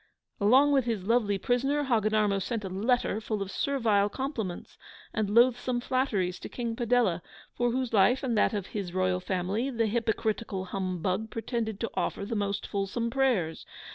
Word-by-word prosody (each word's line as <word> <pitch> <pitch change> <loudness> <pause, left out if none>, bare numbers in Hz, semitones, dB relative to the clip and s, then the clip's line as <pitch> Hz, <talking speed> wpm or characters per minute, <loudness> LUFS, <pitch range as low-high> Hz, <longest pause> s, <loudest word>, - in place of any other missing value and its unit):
Along 260 +8 +5
with 270 -3 +3
his 225 -6 -2
lovely 210 -1 +2
prisoner, 270 +8 +1
Hogginarmo 215 -5 +2
sent 215 +3 -3
a - - -4
letter 220 +2 0
full 215 -1 -3
of 195 -1 -4
servile 220 -7 +1
compliments 225 -8 -4 0.4
and 215 -2 0
loathsome 240 +2 +3
flatteries 240 -8 0
to - - -8
King 235 -2 -3
Padella, 230 -7 +2 0.3
for 245 0 +1
whose 250 0 -2
life, 225 +7 +4
and 245 -3 0
that 215 - +2
of 200 -3 -2
his 190 -4 -5
royal 185 -1 +1
family, 190 +7 -1
the 230 -3 0
HYPOCRITICAL 220 -3 -1
HUMBUG 185 +2 -2
pretended 225 -2 -3
to 230 - -2
offer 200 - -2
the 230 +2 -3
most 200 -1 -1
fulsome 205 +4 -2
prayers. 235 -12 +1
220 Hz, 165 wpm, -28 LUFS, 195-245 Hz, 0.4 s, Along